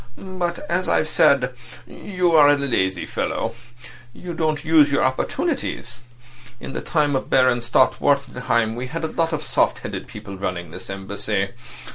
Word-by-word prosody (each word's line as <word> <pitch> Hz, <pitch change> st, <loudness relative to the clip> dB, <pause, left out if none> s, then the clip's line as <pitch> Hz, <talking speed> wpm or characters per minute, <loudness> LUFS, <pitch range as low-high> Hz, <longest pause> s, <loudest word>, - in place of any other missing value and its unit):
"But, 185 Hz, -1 st, -4 dB
as 185 Hz, +2 st, 0 dB
I've 155 Hz, -, +2 dB
said, 140 Hz, -6 st, +3 dB, 0.3 s
you 180 Hz, -3 st, -1 dB
are 150 Hz, -3 st, +7 dB
a 145 Hz, -, +5 dB
lazy 95 Hz, -10 st, 0 dB
fellow; -, -, -2 dB, 0.6 s
you 175 Hz, +5 st, -7 dB
don't 155 Hz, -2 st, -1 dB
use 155 Hz, -2 st, +5 dB
your 140 Hz, -, +2 dB
opportunities. 130 Hz, -, -2 dB, 0.6 s
In -, -, -8 dB
the -, -, -3 dB
time 150 Hz, -4 st, +1 dB
of 130 Hz, -, -2 dB
Baron 130 Hz, -2 st, +3 dB
Stott 120 Hz, +2 st, +2 dB
Wartenheim 125 Hz, -5 st, +1 dB
we 125 Hz, +2 st, -4 dB
had 165 Hz, +5 st, -5 dB
a 160 Hz, -, -1 dB
lot 165 Hz, 0 st, 0 dB
of 155 Hz, -1 st, -2 dB
soft -, -, +1 dB
headed -, -, -5 dB
people 100 Hz, -1 st, -9 dB
running 85 Hz, -3 st, -4 dB
this -, -, -10 dB
Embassy. 100 Hz, +1 st, -3 dB
140 Hz, 160 wpm, -22 LUFS, 120-165 Hz, 0.6 s, are